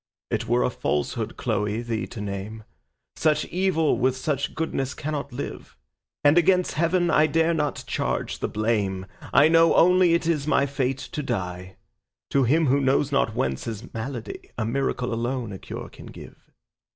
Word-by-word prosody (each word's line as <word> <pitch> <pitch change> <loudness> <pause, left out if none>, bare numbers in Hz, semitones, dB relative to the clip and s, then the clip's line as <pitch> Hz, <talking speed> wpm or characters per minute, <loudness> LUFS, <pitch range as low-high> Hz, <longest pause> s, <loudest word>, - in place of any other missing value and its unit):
It - - -1
were 60 - +2
a - - +1
falsehood, 105 +10 -2
Chloe, 105 0 -1
thee 115 -1 -3
to 115 - -9
name; 105 +2 -5 0.5
Such 150 -1 +2
evil 175 -4 +1
with 130 0 +2
such 140 +2 -2
goodness 135 -4 -2
cannot 145 -2 -4
live; 125 +4 -7 0.5
And 145 +4 +6
against 180 +1 +3
Heaven 170 +2 +1
I 155 0 +5
dare 165 +2 +2
not 150 -3 -1
charge - - -2
the - - -1
blame, 105 -4 -1 0.3
I 140 - +6
only - - +5 0.6
know 165 - +4
it 170 - -1
is 155 -3 0
my 140 -2 +3
fate 135 -2 -1
to 150 +2 -5
die. 90 -7 -4 0.6
To 135 -2 +3
him 155 +7 +3
who 140 +1 +3
knows 135 +1 +2
not 115 -5 +1
whence 65 0 -1
his 110 -3 -7
malady 115 +1 -6
A 110 - -1
miracle 125 0 -1
alone 120 -1 -2
a 95 - -7
cure - - -7
can - - -13
give. - - -13
130 Hz, 170 wpm, -25 LUFS, 110-150 Hz, 0.6 s, And